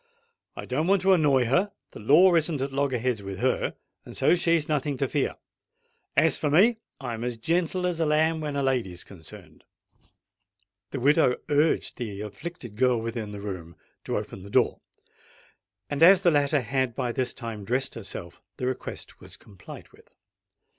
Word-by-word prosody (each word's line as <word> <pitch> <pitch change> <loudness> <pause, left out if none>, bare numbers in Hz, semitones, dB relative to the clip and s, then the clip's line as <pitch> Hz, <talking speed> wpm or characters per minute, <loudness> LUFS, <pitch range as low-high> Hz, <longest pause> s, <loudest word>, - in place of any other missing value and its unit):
I - - -7
don't 150 +6 -1
want 195 -1 +3
to 190 0 +5
annoy 145 -7 +3
her: 180 - +1 0.2
the - - -10
law 155 - +6
isn't 160 -2 +2
at 135 +1 -2
loggerheads 130 -5 0
with 95 -1 -6
her—and - - -3
so - - +4
she's 165 -3 +2
nothing 145 -3 -1
to 135 - 0
fear. 140 +1 -1 0.8
As - - +4
for 150 - 0
me, 215 +10 +4 0.2
I'm 120 -4 -5
as 120 -1 -3
gentle 170 +7 0
as 175 -2 -1
a 165 - +2
lamb 160 +1 +2
when 150 -2 -3
a 140 - 0
lady's 120 -10 -1
concerned." 90 -2 -12 1.3
The 135 - -4
widow 140 -1 +4
urged 150 +2 +1
the 105 -5 -5
afflicted 105 - -8
girl 125 -1 +3
within 115 -1 -4
the 105 -1 -8
room 90 -5 -7 0.3
to - - -1
open 95 - -6
the 100 - -11
door; - - +2 1.1
and 145 +5 -4
as 185 +3 +7
the 175 - +5
latter 145 -1 +2
had 130 0 -1
by 120 - -1
this 130 +1 -1
time 115 -4 -6
dressed 125 +6 -1
herself, 95 -5 -7 0.2
the 125 - -3
request 130 0 -5
was - - -11
complied 95 -4 -13
with. - - -21
135 Hz, 170 wpm, -26 LUFS, 115-155 Hz, 1.3 s, as